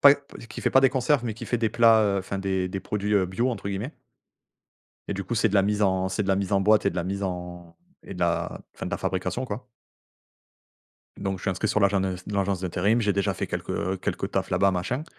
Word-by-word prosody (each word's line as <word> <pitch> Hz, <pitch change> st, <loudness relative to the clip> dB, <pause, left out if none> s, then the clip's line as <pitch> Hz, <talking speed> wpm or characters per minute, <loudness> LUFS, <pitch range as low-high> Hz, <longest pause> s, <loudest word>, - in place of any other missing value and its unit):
pas 140 Hz, 0 st, +9 dB
p 140 Hz, -4 st, -13 dB
qui -, -, -7 dB
fait -, -, +1 dB
pas 135 Hz, -, +6 dB
des 135 Hz, -1 st, +5 dB
conserves 130 Hz, 0 st, +1 dB
mais 110 Hz, -3 st, -2 dB
qui -, -, -8 dB
fait 120 Hz, -, 0 dB
des 115 Hz, -, +1 dB
plats, 115 Hz, -1 st, +6 dB
heu, 100 Hz, -1 st, +2 dB
enfin, 95 Hz, +1 st, -4 dB
des 95 Hz, -1 st, -1 dB
des 95 Hz, +1 st, -4 dB
produits, 105 Hz, 0 st, -1 dB
heu, 95 Hz, -2 st, +3 dB
«Bio», 115 Hz, +8 st, 0 dB
entre 100 Hz, -4 st, -4 dB
guillemets. 100 Hz, +9 st, -4 dB, 1.1 s
Et -, -, -1 dB
du 100 Hz, -, -3 dB
coup, 120 Hz, -, -3 dB
c'est 110 Hz, 0 st, +3 dB
de 100 Hz, -, -3 dB
la 100 Hz, -, +5 dB
mise 105 Hz, +1 st, +1 dB
en 95 Hz, -1 st, +2 dB
c'est 100 Hz, +3 st, -1 dB
de 95 Hz, -, -4 dB
la 95 Hz, -, +3 dB
mise 100 Hz, 0 st, -2 dB
en 100 Hz, -, +4 dB
boîte 105 Hz, +1 st, +4 dB
et 100 Hz, -, +4 dB
de 90 Hz, -, -8 dB
la 85 Hz, -, -1 dB
mise 100 Hz, +2 st, -3 dB
en 90 Hz, -2 st, -5 dB, 0.3 s
et -, -, -9 dB
de -, -, -8 dB
la -, -, 0 dB
enfin, -, -, -6 dB
de -, -, -4 dB
la -, -, -1 dB
fabrication 95 Hz, +7 st, -2 dB
quoi. 125 Hz, +2 st, -6 dB, 1.5 s
Donc 95 Hz, -1 st, -2 dB
je -, -, -14 dB
suis 100 Hz, -, +1 dB
inscrit 95 Hz, +4 st, -1 dB
sur 105 Hz, -, +2 dB
l'agent 100 Hz, -1 st, +3 dB
de 95 Hz, -, 0 dB
heu, 90 Hz, -, -3 dB
dans 100 Hz, -1 st, -2 dB
l'agence 95 Hz, -1 st, -1 dB
d'intérim, 95 Hz, +5 st, +1 dB
j'ai 105 Hz, -3 st, +2 dB
déjà 100 Hz, -1 st, 0 dB
fait -, -, -3 dB
quelques 95 Hz, 0 st, -3 dB
quelques -, -, -2 dB
tafs -, -, -1 dB
là-bas 100 Hz, -1 st, +3 dB
machin. 120 Hz, -, -2 dB
100 Hz, 265 wpm, -26 LUFS, 95-110 Hz, 1.5 s, pas